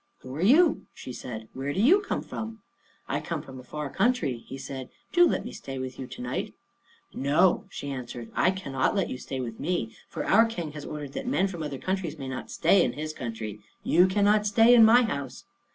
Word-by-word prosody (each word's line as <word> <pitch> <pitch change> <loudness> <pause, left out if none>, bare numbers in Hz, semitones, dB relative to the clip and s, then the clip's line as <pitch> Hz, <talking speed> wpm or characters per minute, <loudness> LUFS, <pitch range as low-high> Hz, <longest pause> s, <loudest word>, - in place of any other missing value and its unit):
"Who 130 +1 -8
are 155 - -4
you?" 300 - +4
she 125 - -8
said. 110 -3 -7
"Where 135 +2 -3
do - - -2
you 310 - +6
come 420 - -3
from?" 220 -1 -7 0.4
"I - - -1
come - - -4
from 130 -1 -10
a - - -11
far 150 +3 -5
country," 190 - +1
he 135 - -7
said; 130 -1 -7 0.2
"do 350 -1 +7
let - - -1
me - - -5
stay 135 0 -7
with 130 0 -5
you 130 - -5
to - - -9
night." 125 - -3 0.6
"No," 145 +7 +3
she 140 - -6
answered, 120 -3 -6
"I 175 - +3
cannot 185 -8 -1
let 195 - 0
you 130 - -5
stay 135 - -5
with 115 -3 -5
me; 150 -10 -1 0.2
for - - -4
our 225 +3 +5
King 175 -9 -5
has 150 -1 -8
ordered 145 -2 -6
that 265 - -5
men 220 -7 +2
from 175 -4 -6
other 145 -3 -4
countries 185 -2 -3
may 135 -2 -6
not 130 0 -5
stay 195 -3 +4
in 120 - 0
his 155 +1 -5
country. 110 -5 -5 0.2
You 180 +3 +5
cannot 205 +2 +3
stay 225 +4 +6
in 235 -2 +8
my 235 +3 +7
house." 140 - -4
150 Hz, 220 wpm, -27 LUFS, 130-205 Hz, 0.6 s, in